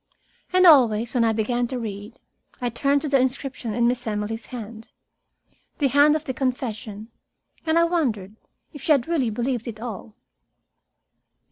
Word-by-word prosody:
And 370 Hz, 0 st, +4 dB
always, 240 Hz, -8 st, +5 dB
when 245 Hz, -3 st, +2 dB
I 225 Hz, -, +3 dB
began 240 Hz, +3 st, 0 dB
to 255 Hz, -, -4 dB
read, 210 Hz, -1 st, -7 dB, 0.4 s
I 245 Hz, -, -1 dB
turned 280 Hz, +5 st, +1 dB
to -, -, -2 dB
the 275 Hz, -1 st, +3 dB
inscription 255 Hz, -3 st, -2 dB
in 235 Hz, 0 st, +2 dB
Miss 245 Hz, 0 st, -1 dB
Emily's 210 Hz, +1 st, -3 dB
hand, 225 Hz, -2 st, -8 dB, 0.9 s
the 280 Hz, -3 st, +2 dB
hand 290 Hz, +3 st, +5 dB
of 310 Hz, -, -2 dB
the 260 Hz, -, -3 dB
confession 230 Hz, -4 st, -4 dB, 0.6 s
and 320 Hz, +1 st, +3 dB
I 335 Hz, -, +5 dB
wondered 240 Hz, -, -1 dB, 0.4 s
if 290 Hz, -, -10 dB
she 310 Hz, -, +4 dB
had 275 Hz, -2 st, 0 dB
really 305 Hz, -8 st, +1 dB
believed 240 Hz, +2 st, -2 dB
it 220 Hz, -2 st, -6 dB
all. 220 Hz, -2 st, -7 dB
245 Hz, 160 wpm, -23 LUFS, 220-275 Hz, 0.9 s, always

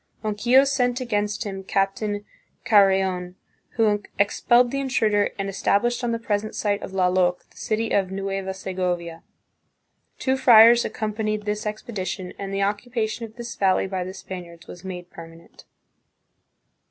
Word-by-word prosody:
Ronquillo 235 Hz, +5 st, +4 dB
sent 255 Hz, -3 st, 0 dB
against 210 Hz, -3 st, -1 dB
him 195 Hz, -2 st, -6 dB
Captain 205 Hz, +2 st, -1 dB, 0.4 s
Carreon, 190 Hz, -3 st, +3 dB, 0.4 s
who 210 Hz, -2 st, +2 dB, 0.2 s
expelled 240 Hz, +4 st, +3 dB
the 275 Hz, -, -1 dB
intruder 220 Hz, -6 st, +1 dB
and 195 Hz, -1 st, -3 dB
established 220 Hz, +5 st, 0 dB
on 240 Hz, -, 0 dB
the 230 Hz, -, 0 dB
present 215 Hz, -2 st, -2 dB
site 205 Hz, -1 st, -1 dB
of -, -, -7 dB
Lallok 180 Hz, -1 st, +1 dB
the -, -, -23 dB
city 220 Hz, +1 st, -2 dB
of 195 Hz, -2 st, +1 dB
Nueva 195 Hz, 0 st, -3 dB
Segovia. 180 Hz, -3 st, -3 dB, 1.0 s
Two 265 Hz, 0 st, 0 dB
friars 235 Hz, -2 st, +7 dB
accompanied 215 Hz, -1 st, -3 dB
this 210 Hz, +1 st, -2 dB
expedition 205 Hz, -3 st, -5 dB
and 195 Hz, -1 st, -5 dB
the 195 Hz, 0 st, 0 dB
occupation 220 Hz, +2 st, -2 dB
of 220 Hz, 0 st, -14 dB
this 240 Hz, -1 st, -7 dB
valley 190 Hz, -1 st, +2 dB
by 190 Hz, -1 st, -3 dB
the 185 Hz, +1 st, -7 dB
Span 185 Hz, -1 st, -7 dB
iards 170 Hz, 0 st, -15 dB
was 175 Hz, -, -11 dB
made 180 Hz, -2 st, -7 dB
permanent. 165 Hz, 0 st, -13 dB
205 Hz, 145 wpm, -24 LUFS, 190-225 Hz, 1.0 s, friars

